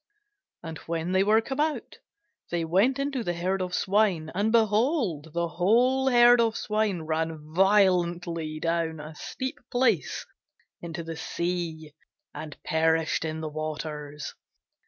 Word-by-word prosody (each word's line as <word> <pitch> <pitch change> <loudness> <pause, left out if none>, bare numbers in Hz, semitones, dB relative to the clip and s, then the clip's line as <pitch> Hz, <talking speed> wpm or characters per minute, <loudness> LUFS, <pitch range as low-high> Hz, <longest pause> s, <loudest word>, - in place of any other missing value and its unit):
And 160 -1 -7
when 165 +1 -2
they 190 +1 +3
were 215 +2 +4
come 265 +4 -5
out, 305 0 -2 0.5
they 170 -1 -1
went 200 +11 +3
into 275 -3 -2
the 175 -4 -2
herd 185 +3 -1
of 180 0 -2
swine: 190 -6 +1
and, 205 +4 +1
behold, 220 - +2
the 170 0 0
whole 245 +10 +3
herd 240 -1 +6
of 225 -1 +1
swine 210 -5 -1
ran 155 -1 -3
violently 175 -4 +2
down 165 -1 -1
a 155 +1 -8
steep 260 - -5
place 240 - +1 0.6
into 170 0 -6
the 165 -1 -6
sea, 165 -2 -3 0.4
and 155 -2 -8
perished 160 -1 +1
in 160 0 -3
the 160 - -3
waters. 150 -1 -5
175 Hz, 135 wpm, -27 LUFS, 160-220 Hz, 0.6 s, herd